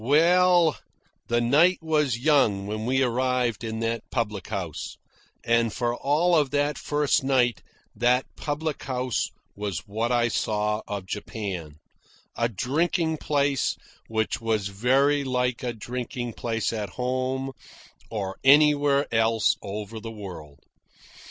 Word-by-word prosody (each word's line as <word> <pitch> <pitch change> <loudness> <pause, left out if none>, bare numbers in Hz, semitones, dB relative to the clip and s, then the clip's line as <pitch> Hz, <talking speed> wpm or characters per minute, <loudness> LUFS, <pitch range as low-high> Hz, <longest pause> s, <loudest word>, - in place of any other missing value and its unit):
Well, 170 +4 +4 0.5
the 120 0 +2
night 150 +10 +4
was 150 -6 +1
young 120 -8 +3
when 110 +2 -4
we 130 +1 +2
arrived 125 -1 0
in 110 0 -4
that 115 0 -1
public 105 -4 -2
house, 90 -6 -5 0.5
and 115 -1 +2
for 120 0 -1
all 155 +7 +2
of 150 -4 +3
that 145 +1 0
first 145 -2 +1
night 125 -4 +2 0.3
that 125 +2 +2
public 150 0 -3
house 125 -2 -1 0.3
was 100 -4 -4
what 110 +3 -2
I 120 -1 +3
saw 105 -1 -1
of 100 -2 -4
Japan 95 -6 -5 0.6
a 115 0 +1
drinking 160 - 0
place 140 -4 0 0.3
which 110 +1 -1
was 110 -3 0
very 135 +8 +2
like 125 -2 -1
a 125 - -2
drinking 120 +1 -5
place 115 0 -2
at 105 -3 -3
home 130 +1 -1 0.6
or 100 -4 -4
anywhere 145 0 +5
else 115 -1 +3
over 105 +2 -6
the 115 +1 -7
world. 85 -9 -9
120 Hz, 130 wpm, -25 LUFS, 110-140 Hz, 0.6 s, anywhere